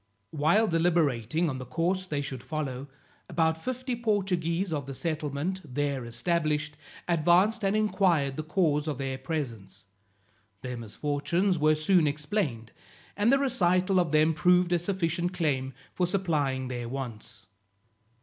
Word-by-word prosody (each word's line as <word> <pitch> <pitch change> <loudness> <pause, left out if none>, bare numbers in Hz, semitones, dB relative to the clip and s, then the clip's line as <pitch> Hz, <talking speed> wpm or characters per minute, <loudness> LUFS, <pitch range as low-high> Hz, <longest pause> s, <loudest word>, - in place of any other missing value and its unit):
While 155 +9 +3
deliberating 165 - +1
on 130 -4 -3
the 130 - -6
course 175 +6 -1
they 145 -4 -2
should 130 -3 -6
follow, 140 -3 -4 0.4
about 160 -1 0
fifty 255 0 -3
Portuguese 190 -6 0
of 145 -3 -3
the 135 - -6
settlement, 155 +3 -2
there 140 -2 -2
established, 150 +4 -1 0.3
advanced 180 +6 +3
and 195 +1 +2
inquired 180 -10 +2
the 155 - -3
cause 155 -2 +1
of 150 -4 -2
their 135 -1 -3
presence. 115 - -5 0.8
Their 125 -1 -4
misfortunes 150 - -1
were 155 +1 +4
soon 155 +1 +3
explained, 145 - -2 0.4
and 210 +4 +3
the 275 - +5
recital 185 -8 +2
of 170 -4 +1
them 155 +1 +4
proved 180 +3 +3
a 175 - +3
sufficient 175 -1 -1
claim 140 -7 -1 0.2
for 180 - 0
supplying 150 -9 0
their 120 -2 -4
wants. 120 -5 -7
155 Hz, 140 wpm, -28 LUFS, 140-180 Hz, 0.8 s, the